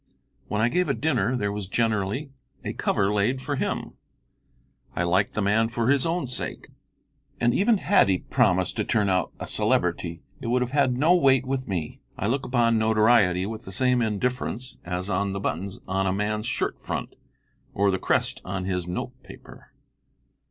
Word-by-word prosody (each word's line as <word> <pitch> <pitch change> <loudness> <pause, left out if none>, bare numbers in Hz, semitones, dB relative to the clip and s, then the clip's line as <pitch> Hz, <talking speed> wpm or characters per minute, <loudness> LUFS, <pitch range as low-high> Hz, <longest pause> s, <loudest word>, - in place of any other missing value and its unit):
When 105 +1 0
I 120 - +4
gave 180 +5 +1
a 135 - +1
dinner 125 -2 +1
there 100 -3 -1
was 100 -2 -4
generally 110 +5 0 0.3
a - - -3
cover 100 +1 +1
laid 105 +6 +1
for 145 +2 -3
him. - - -3 1.0
I 90 - 0
liked 90 +3 +1
the 105 - 0
man 110 +3 +3
for 115 +2 0
his 140 +2 +2
own 170 -1 -1
sake, 125 - -5 0.7
and 120 0 +3
even 215 - +3
had 195 - +3
he 95 - +3
promised 95 -6 +1
to - - +1
turn 105 -3 +1
out 90 -3 +1
a - - -4
celebrity 85 -1 0 0.2
it - - -6
would 125 +2 +2
have 125 - -5
had 135 -3 +2
no 155 +6 +4
weight 135 -7 +4
with 130 0 -2
me. 90 -6 -4 0.2
I - - -2
look 130 +6 0
upon 115 -2 +3
notoriety 110 -4 +4
with 110 +2 -6
the 95 - -8
same 125 +5 +2
indifference 120 +2 -2
as 90 +1 -3
on 100 0 0
the 100 - -3
buttons 95 0 -3
on 95 +1 0
a - - +2
man's 105 +2 -1
shirt 125 - -2
front, - - -4 0.6
or 100 0 +2
the 95 - -1
crest - - 0
on 90 0 -4
his 90 -2 -2
note 90 - -4
paper. - - -14
110 Hz, 185 wpm, -25 LUFS, 95-125 Hz, 1.0 s, I